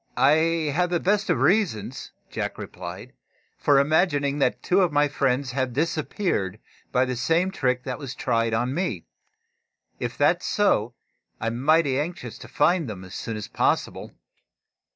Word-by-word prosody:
"I 135 Hz, +3 st, +5 dB, 0.4 s
have 180 Hz, +3 st, +1 dB
the 175 Hz, -1 st, +1 dB
best 205 Hz, +3 st, +1 dB
of 175 Hz, -, +3 dB
reasons," 135 Hz, -, 0 dB, 0.2 s
Jack -, -, -3 dB
replied, -, -, -8 dB, 0.5 s
"for 145 Hz, -, +4 dB
imagining 145 Hz, -1 st, +2 dB
that 130 Hz, -2 st, +1 dB
two 185 Hz, +2 st, +3 dB
of 180 Hz, -4 st, +2 dB
my 145 Hz, 0 st, +3 dB
friends 135 Hz, -2 st, 0 dB
have 130 Hz, -1 st, -1 dB
disappeared 150 Hz, -, -1 dB, 0.3 s
by 125 Hz, +1 st, +3 dB
the 125 Hz, 0 st, -3 dB
same 165 Hz, +9 st, +1 dB
trick 125 Hz, -8 st, 0 dB
that 130 Hz, -1 st, -4 dB
was 140 Hz, -4 st, -6 dB
tried 115 Hz, 0 st, 0 dB
on 120 Hz, +3 st, 0 dB
me. 180 Hz, +6 st, -2 dB, 0.9 s
If -, -, -4 dB
that -, -, +4 dB
is -, -, -5 dB
so, 120 Hz, -, +1 dB, 0.4 s
I'm 115 Hz, +2 st, -2 dB
mighty 150 Hz, -2 st, +3 dB
anxious 150 Hz, -7 st, -5 dB
to -, -, -10 dB
find 160 Hz, -2 st, +2 dB
them 95 Hz, -3 st, -7 dB
as 95 Hz, -, -11 dB
soon 115 Hz, -1 st, -4 dB
as 105 Hz, -, -6 dB
possible." -, -, -1 dB
140 Hz, 160 wpm, -25 LUFS, 125-170 Hz, 0.9 s, I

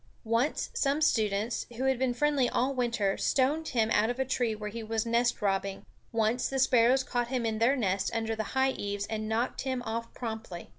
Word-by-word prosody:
Once 230 Hz, +6 st, 0 dB
some 280 Hz, +1 st, +1 dB
students, 220 Hz, -6 st, +1 dB
who 260 Hz, -, -2 dB
had 265 Hz, -2 st, +2 dB
been 260 Hz, -1 st, +1 dB
friendly 275 Hz, 0 st, +2 dB
all 260 Hz, +3 st, 0 dB
winter, 230 Hz, -6 st, 0 dB
stoned 290 Hz, +4 st, +1 dB
him 225 Hz, -3 st, +1 dB
out 220 Hz, +1 st, +3 dB
of 245 Hz, -, -2 dB
a 265 Hz, -, 0 dB
tree 240 Hz, -3 st, 0 dB
where 210 Hz, 0 st, -6 dB
he 230 Hz, +2 st, -5 dB
was 220 Hz, 0 st, -2 dB
nestrobbing; 210 Hz, -5 st, 0 dB, 0.3 s
once 225 Hz, +2 st, +1 dB
the 270 Hz, -, -2 dB
sparrows 255 Hz, 0 st, +4 dB
caught 245 Hz, -2 st, -1 dB
him 245 Hz, -2 st, -1 dB
in 220 Hz, -1 st, -1 dB
their 240 Hz, +5 st, +4 dB
nest 195 Hz, -6 st, 0 dB
under 225 Hz, 0 st, -1 dB
the 220 Hz, +4 st, -4 dB
high 265 Hz, 0 st, +4 dB
eaves, 205 Hz, -3 st, -3 dB
and 215 Hz, 0 st, -3 dB
knocked 230 Hz, +3 st, -1 dB
him 260 Hz, -2 st, -2 dB
off 230 Hz, +1 st, -4 dB
promptly. 220 Hz, -7 st, -6 dB
235 Hz, 200 wpm, -29 LUFS, 220-260 Hz, 0.3 s, sparrows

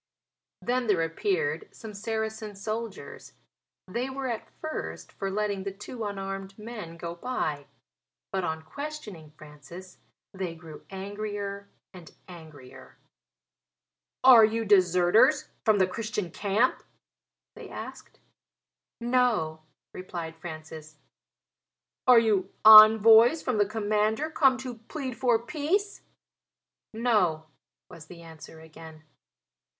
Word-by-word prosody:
Then 250 Hz, 0 st, -1 dB
there 185 Hz, -6 st, +2 dB
appeared 415 Hz, -, -2 dB
some 220 Hz, -2 st, -11 dB
Saracen 220 Hz, 0 st, -4 dB
soldiers. 215 Hz, +1 st, -7 dB, 0.5 s
They 240 Hz, +7 st, -3 dB
were, 265 Hz, 0 st, -5 dB
at 230 Hz, -2 st, -5 dB
first, 315 Hz, 0 st, -6 dB
for 195 Hz, -, -5 dB
letting 200 Hz, -1 st, -2 dB
the 195 Hz, -, -4 dB
two 210 Hz, +4 st, -8 dB
unarmed 195 Hz, -1 st, -6 dB
men 210 Hz, -7 st, -9 dB
go 170 Hz, 0 st, -6 dB
by; 170 Hz, -, -4 dB, 0.6 s
but, 190 Hz, -1 st, -2 dB
on 160 Hz, -1 st, -3 dB
questioning 220 Hz, -, -8 dB
Francis, 155 Hz, +5 st, -13 dB, 0.3 s
they 185 Hz, -3 st, -5 dB
grew 160 Hz, -2 st, -12 dB
angrier 200 Hz, 0 st, -6 dB, 0.2 s
and 175 Hz, -3 st, -14 dB
angrier. 155 Hz, -7 st, -14 dB, 1.3 s
"Are 250 Hz, -3 st, +9 dB
you 225 Hz, +1 st, +1 dB
deserters 190 Hz, -, +4 dB, 0.2 s
from 215 Hz, -2 st, +4 dB
the 190 Hz, -, +4 dB
Christian 210 Hz, -2 st, -4 dB
camp?" 210 Hz, +8 st, 0 dB, 0.7 s
they -, -, -11 dB
asked. -, -, -10 dB, 0.8 s
"No," 235 Hz, -10 st, 0 dB, 0.3 s
replied 170 Hz, -3 st, -7 dB
Francis. 155 Hz, -2 st, -10 dB, 1.1 s
"Are 250 Hz, -1 st, +8 dB
you 205 Hz, -4 st, +2 dB
envoys 220 Hz, +5 st, +9 dB
from 245 Hz, -5 st, -1 dB
the 205 Hz, -, +3 dB
commander 215 Hz, +6 st, -1 dB
come 270 Hz, -4 st, +3 dB
to 245 Hz, -3 st, -7 dB
plead 265 Hz, -5 st, -5 dB
for 240 Hz, -1 st, +2 dB
peace?" 345 Hz, -, -2 dB, 0.9 s
"No," 210 Hz, -9 st, +1 dB, 0.4 s
was 155 Hz, -1 st, -13 dB
the 170 Hz, -1 st, -13 dB
answer 160 Hz, 0 st, -13 dB
again. 160 Hz, 0 st, -13 dB
205 Hz, 110 wpm, -27 LUFS, 175-235 Hz, 1.3 s, Are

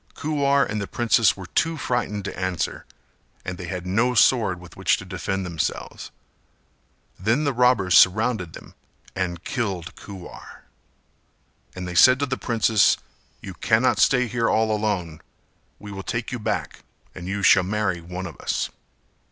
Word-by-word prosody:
Kuwar 140 Hz, -2 st, +1 dB
and 105 Hz, -1 st, -3 dB
the 100 Hz, -, -4 dB
princess 115 Hz, -2 st, +2 dB
were 95 Hz, -, -8 dB
too 165 Hz, -, 0 dB
frightened 105 Hz, -7 st, -2 dB
to -, -, -5 dB
answer 95 Hz, -2 st, -3 dB, 0.6 s
and 90 Hz, 0 st, -5 dB
they 90 Hz, -, -6 dB
had 90 Hz, 0 st, -5 dB
no 115 Hz, +7 st, +1 dB
sword 110 Hz, -8 st, +3 dB
with 90 Hz, -2 st, -14 dB
which -, -, +2 dB
to -, -, -9 dB
defend 95 Hz, +1 st, -3 dB
themselves. 85 Hz, -3 st, -4 dB, 1.1 s
Then 110 Hz, -, +1 dB
the 140 Hz, -2 st, 0 dB
robbers 120 Hz, -7 st, +3 dB
surrounded 105 Hz, -2 st, +4 dB
them -, -, -12 dB, 0.4 s
and 90 Hz, -2 st, -3 dB
killed 100 Hz, -9 st, -3 dB
Kuwar, 95 Hz, -3 st, -11 dB, 1.1 s
and 90 Hz, 0 st, -5 dB
they 90 Hz, -, -5 dB
said 130 Hz, +9 st, +7 dB
to 140 Hz, -, 0 dB
the 130 Hz, -1 st, -2 dB
princess 115 Hz, -4 st, +2 dB, 0.4 s
"You 95 Hz, -, -8 dB
cannot 110 Hz, +7 st, +2 dB
stay 125 Hz, -1 st, +4 dB
here 115 Hz, -1 st, -1 dB
all 110 Hz, -1 st, +2 dB
alone; 95 Hz, -7 st, -2 dB, 0.6 s
we 105 Hz, 0 st, -10 dB
will 95 Hz, -1 st, -6 dB
take 115 Hz, +5 st, -4 dB
you 125 Hz, -, -4 dB
back 105 Hz, -, -3 dB, 0.3 s
and 90 Hz, -1 st, -8 dB
you 100 Hz, +1 st, -3 dB
shall 95 Hz, -, +6 dB
marry 95 Hz, -2 st, -1 dB
one 90 Hz, +2 st, -6 dB
of 85 Hz, -, -8 dB
us." -, -, -2 dB
100 Hz, 160 wpm, -23 LUFS, 90-120 Hz, 1.1 s, said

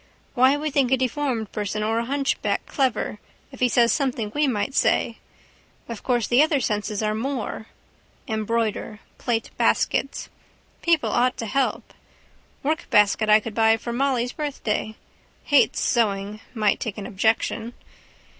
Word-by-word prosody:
Why 260 Hz, +2 st, +4 dB
we 305 Hz, +1 st, -3 dB
think 270 Hz, -3 st, +2 dB
a 265 Hz, -, +4 dB
deformed 255 Hz, -4 st, -2 dB
person 210 Hz, 0 st, -3 dB
or 225 Hz, +1 st, +1 dB
a 235 Hz, -, -2 dB
hunchback 275 Hz, +2 st, -1 dB
clever 250 Hz, -6 st, -1 dB, 0.3 s
if 265 Hz, -, -12 dB
he 250 Hz, -, +3 dB
says 235 Hz, -1 st, +4 dB
something 245 Hz, -7 st, -1 dB
we 295 Hz, 0 st, +2 dB
might 245 Hz, +1 st, -1 dB
say. -, -, +1 dB, 0.7 s
Of 230 Hz, -3 st, -7 dB
course 240 Hz, -4 st, +1 dB
the 245 Hz, +3 st, +5 dB
other 305 Hz, -2 st, +3 dB
senses 210 Hz, -2 st, -2 dB
are 215 Hz, 0 st, +1 dB
more. 225 Hz, -1 st, -4 dB, 0.6 s
Embroider. 220 Hz, -1 st, -2 dB, 0.2 s
Plait 230 Hz, -2 st, -2 dB
baskets. 275 Hz, -, +1 dB, 0.5 s
People 335 Hz, -3 st, +2 dB
ought 250 Hz, +1 st, +2 dB
to 230 Hz, -, -4 dB
help. 265 Hz, +4 st, -1 dB, 0.7 s
Workbasket 215 Hz, -8 st, +2 dB
I 215 Hz, 0 st, +7 dB
could 220 Hz, 0 st, -7 dB
buy 225 Hz, 0 st, +4 dB
for 235 Hz, +1 st, -5 dB
Molly's 250 Hz, -1 st, 0 dB
birthday. 235 Hz, -7 st, -3 dB, 0.5 s
Hates 285 Hz, -2 st, +3 dB
sewing. 210 Hz, -3 st, 0 dB, 0.2 s
Might 215 Hz, -2 st, +2 dB
take 220 Hz, -3 st, -4 dB
an 205 Hz, -, -6 dB
objection. 220 Hz, +3 st, 0 dB
235 Hz, 145 wpm, -24 LUFS, 215-270 Hz, 0.7 s, I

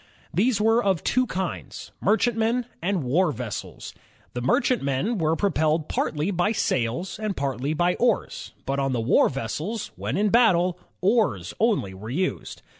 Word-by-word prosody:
These 215 Hz, +5 st, +2 dB
were 225 Hz, +3 st, +3 dB
of 190 Hz, -5 st, +1 dB
two 255 Hz, 0 st, +2 dB
kinds, 185 Hz, -3 st, -5 dB
merchantmen 225 Hz, +3 st, +2 dB, 0.2 s
and 180 Hz, -2 st, 0 dB
war 155 Hz, +7 st, +2 dB
vessels. 120 Hz, -5 st, -6 dB, 0.4 s
The 120 Hz, -, -3 dB
merchantmen 145 Hz, -, +1 dB
were 160 Hz, 0 st, +2 dB
propeUed 160 Hz, -5 st, +1 dB
partly 155 Hz, +6 st, -1 dB
by 185 Hz, +4 st, +1 dB
sails 130 Hz, -, -1 dB
and 215 Hz, -3 st, -3 dB
partly 140 Hz, +2 st, -1 dB
by 175 Hz, +3 st, +2 dB
oars, 235 Hz, -3 st, 0 dB
but 135 Hz, +1 st, -1 dB
on 135 Hz, -1 st, 0 dB
the 120 Hz, -, 0 dB
war 115 Hz, +3 st, +4 dB
vessels, 150 Hz, -, -4 dB
when -, -, -3 dB
in 210 Hz, +1 st, +2 dB
battle, 185 Hz, -6 st, +3 dB, 0.2 s
oars 220 Hz, +3 st, +1 dB
only 210 Hz, -, +1 dB
were 100 Hz, +4 st, -9 dB
used. 180 Hz, +9 st, -3 dB
180 Hz, 150 wpm, -25 LUFS, 140-215 Hz, 0.4 s, war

